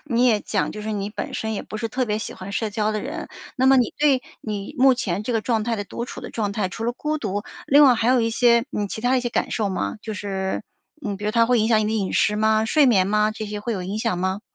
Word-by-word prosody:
你 250 -3 +2
也 220 -4 +3
讲， - - -1
就 210 - -7
是 220 - -3
你 205 -1 -2
本 210 - -5
身 220 0 -2
也 - - -3
不 215 - -7
是 230 +1 -3
特 255 +3 -1
别 210 -2 -1
喜 - - -6
欢 185 +1 -8
社 215 +2 -2
交 215 0 0
的 215 - -2
人。 - - -6 0.3
那 260 - +2
么 270 0 +7
你 245 -4 +2
对 285 -3 +4 0.2
你 205 -2 -5
目 265 0 +6
前 200 -6 -2
这 245 - -2
个 225 - +1
状 225 -1 0
态 230 0 -1
的 205 - -3
独 235 - -5
处 - - -8
的 - - -8
状 210 -3 -2
态， 200 -2 -1
除 225 - -7
了 240 - 0
孤 305 +4 -2
独， 205 -4 -3 0.2
另 290 +1 +7
外 255 - +7
还 230 +1 0
有 255 -1 +4
一 230 0 +1
些， 235 0 +4
嗯， 205 -1 -1
其 220 - -5
它 250 +3 +2
一 - - +2
些 245 - -2
感 - - -1
受 210 -3 0
吗？ 190 +3 -2
就 220 - -5
是 190 -2 -3 0.4
呃， 205 -2 -2
比 205 - -8
如 210 - +1
它 230 0 +3
会 245 -1 +3
影 220 - +1
响 220 -2 +4
你 - - 0
的 215 - -1
饮 200 -4 -1
食 210 - +2
吗？ 220 0 +2
睡 290 +4 +4
眠 190 -6 +4
吗？ 210 +1 +2
这 215 0 -6
些 210 0 -5
会 235 +3 -3
有 190 -4 -3
影 200 +3 -4
响 220 -5 -1
吗？ 190 +2 -1
220 Hz, 320 characters per minute, -23 LUFS, 205-240 Hz, 0.4 s, 么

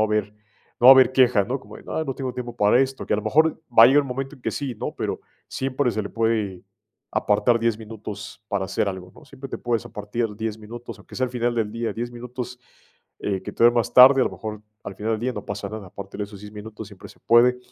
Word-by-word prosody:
a - - +3
haber 105 -1 -1 0.5
no 120 - +5
va - - +11
a 135 - +12
haber 130 -1 +5
queja, 125 -6 +4
¿no?, 130 +5 -3
como - - -12
de: - - -15
"Ah, 160 - -2
no 135 -3 -3
tengo 130 -2 -3
tiempo 120 -1 -6
para 105 +5 +4
esto", 135 0 -2
que - - -1
a - - +1
lo 105 - -3
mejor, 155 +9 +2
va 115 -1 +8
a - - +10
llegar 145 +3 +5
el - - -8
momento 135 +3 -4
en 130 - -21
que 115 - -1
sí, 135 0 -4
¿no?, - - -5
pero - - -4 0.3
siempre 130 -1 -1
se 110 +1 -2
le 100 - -5
puede, 110 -5 -1 0.5
apartar 105 +3 +2
10 115 -1 +1
minutos 105 -2 -9
para 100 -3 -1
hacer 95 +2 -1
algo, 90 -1 -7
¿no?, - - -16
siempre 135 -1 -10
te - - -5
puedes 120 -2 -1
apartar 105 +1 -4
10 110 0 -4
minutos, 115 +3 -9
aunque - - -15
sea 130 - 0
al - - -8
final 120 -1 -1
del 110 -2 -1
día, 115 +1 -3
10 120 +1 -4
minutos, 125 +1 -7 0.6
eh, 95 -2 -2
que - - -7
te - - -3
dé 120 - +9
más 120 -3 0
tarde, 130 +1 +9
a - - +4
lo - - -1
mejor 110 -1 -7 0.2
al 100 - -6
final 110 +2 -2
del 110 - -2
día 125 +1 -1
no 105 -3 -7
pasa 100 0 -5
nada, 110 -3 -7
aparte 100 +2 -9
en 105 - -3
esos 100 -1 -12
10 105 0 -10
minutos 105 0 -9
siempre 100 -3 -13
se - - -18
puede, 125 +2 +4
115 Hz, 270 wpm, -23 LUFS, 105-125 Hz, 0.6 s, a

